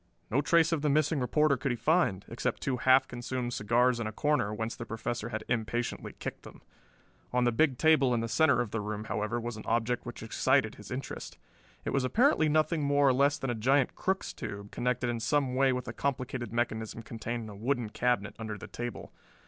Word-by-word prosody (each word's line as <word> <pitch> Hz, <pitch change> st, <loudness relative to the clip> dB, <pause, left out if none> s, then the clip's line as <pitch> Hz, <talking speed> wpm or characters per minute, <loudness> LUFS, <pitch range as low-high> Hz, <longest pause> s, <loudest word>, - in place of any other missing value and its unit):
No 130 Hz, +6 st, +3 dB
trace 165 Hz, +2 st, +4 dB
of 165 Hz, -3 st, 0 dB
the 150 Hz, -, +1 dB
missing 155 Hz, +1 st, +2 dB
reporter 140 Hz, +4 st, +3 dB
could 135 Hz, +1 st, -1 dB
he -, -, 0 dB
find, 135 Hz, -, +1 dB
except 115 Hz, -, -3 dB
two 130 Hz, -2 st, 0 dB
half 130 Hz, +2 st, +5 dB
consumed 120 Hz, 0 st, -4 dB
cigars 120 Hz, +3 st, +2 dB
in 115 Hz, -, -2 dB
a -, -, -3 dB
corner 145 Hz, -3 st, +1 dB
whence 110 Hz, +2 st, -3 dB
the -, -, -6 dB
Professor 115 Hz, 0 st, -4 dB
had 110 Hz, -2 st, -4 dB
impatiently 120 Hz, 0 st, -2 dB
kicked -, -, -6 dB
them. -, -, -14 dB, 0.7 s
On 125 Hz, 0 st, +2 dB
the 120 Hz, -, +3 dB
big 130 Hz, +2 st, +2 dB
table 155 Hz, -4 st, +4 dB
in 120 Hz, -, +2 dB
the 115 Hz, -, -2 dB
center 135 Hz, 0 st, +3 dB
of 115 Hz, -4 st, -4 dB
the 115 Hz, -, -2 dB
room, 105 Hz, 0 st, -4 dB
however, 110 Hz, +2 st, -2 dB
was 120 Hz, -1 st, -5 dB
an 110 Hz, -, -9 dB
object 115 Hz, +1 st, 0 dB
which -, -, -8 dB
excited -, -, +2 dB
his -, -, -12 dB
interest. -, -, -6 dB, 0.5 s
It -, -, -1 dB
was 135 Hz, -, +1 dB
apparently 210 Hz, -, +3 dB
nothing 155 Hz, +1 st, +2 dB
more 140 Hz, -1 st, +3 dB
or -, -, +4 dB
less 140 Hz, +3 st, +3 dB
than 135 Hz, -4 st, -2 dB
a -, -, 0 dB
giant 130 Hz, +4 st, +2 dB
Crookes 190 Hz, +1 st, -2 dB
tube, 100 Hz, 0 st, -7 dB
connected 125 Hz, 0 st, -1 dB
in 120 Hz, -1 st, -1 dB
some 130 Hz, +3 st, +1 dB
way 135 Hz, +1 st, +3 dB
with 125 Hz, -1 st, -3 dB
a 120 Hz, -, -4 dB
complicated 130 Hz, -2 st, -3 dB
mechanism 115 Hz, -1 st, -2 dB
contained 115 Hz, +1 st, -5 dB
in 110 Hz, -, -8 dB
a 105 Hz, -, -9 dB
wooden 120 Hz, 0 st, -1 dB
cabinet 120 Hz, -4 st, 0 dB
under 110 Hz, -2 st, -4 dB
the -, -, -9 dB
table. 120 Hz, 0 st, -6 dB
125 Hz, 215 wpm, -30 LUFS, 115-140 Hz, 0.7 s, half